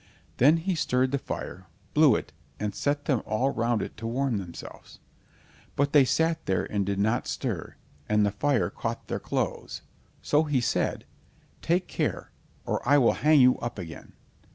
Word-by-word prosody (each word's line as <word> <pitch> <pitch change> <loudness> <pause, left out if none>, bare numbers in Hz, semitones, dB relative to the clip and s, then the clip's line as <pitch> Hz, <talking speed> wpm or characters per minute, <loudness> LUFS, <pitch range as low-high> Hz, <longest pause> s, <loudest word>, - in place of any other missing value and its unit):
Then 145 +6 +6
he 185 +3 -1
stirred 130 -5 +1
the 140 - 0
fire, 95 -6 -6 0.3
blew 150 -6 +6
it, - - -5 0.3
and 105 -1 -2
set 145 0 -1
them 130 -6 +1
all 125 +6 0
round 120 -2 0
it - - -7
to 115 +1 -5
warm 125 0 0
themselves. 90 -3 -10 0.8
But 140 0 +1
they 145 -3 +7
sat 160 +5 0
there 95 - +1
and 100 -1 -1
did 100 0 -2
not 110 +5 +1
stir, 110 - -4 0.3
and 105 0 +3
the 100 - +1
fire 135 +5 +1
caught - - -5
their - - -2
clothes. - - -3 0.4
So 150 +2 +2
he 145 -4 +1
said: 120 - -1 0.6
"Take 175 +2 +1
care, - - -3 0.3
or - - -1
I 145 +3 +4
will 125 -5 +4
hang 150 -2 +4
you 125 0 +5
up 120 -2 -5
again." 85 -4 -9
125 Hz, 175 wpm, -27 LUFS, 105-145 Hz, 0.8 s, they